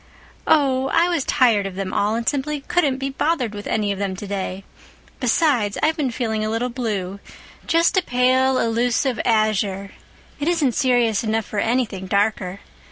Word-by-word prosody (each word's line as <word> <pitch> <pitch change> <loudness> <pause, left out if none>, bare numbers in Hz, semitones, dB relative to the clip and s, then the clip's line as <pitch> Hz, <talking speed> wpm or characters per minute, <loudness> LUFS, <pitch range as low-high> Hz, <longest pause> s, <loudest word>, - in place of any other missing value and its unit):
"Oh, 270 -3 +3
I 335 +2 +3
was 335 -5 0
tired 220 -6 +3
of 190 - -8
them 190 -1 -4
all 210 +2 +1
and 230 0 -3
simply 290 +1 -1
couldn't 280 -3 +1
be 270 0 -3
bothered 270 -5 -1
with 205 0 -7
any 210 -2 0
of 195 - -4
them 195 -2 -2
today. 195 -1 -5 0.6
Besides, 245 -5 +1
I've 315 +1 +3
been 290 -5 -1
feeling 220 -2 -2
a 215 - -1
little 230 +3 -1
blue—just 230 - -2
a - - +5
pale, 255 -1 +2
elusive 240 +2 0
azure. 210 -3 0 0.5
It 290 - -2
isn't 325 -7 +2
serious 240 -6 +2
enough 220 -1 -1
for 210 - -4
anything 225 -5 -1
darker. 200 -1 0
230 Hz, 165 wpm, -21 LUFS, 205-265 Hz, 0.6 s, a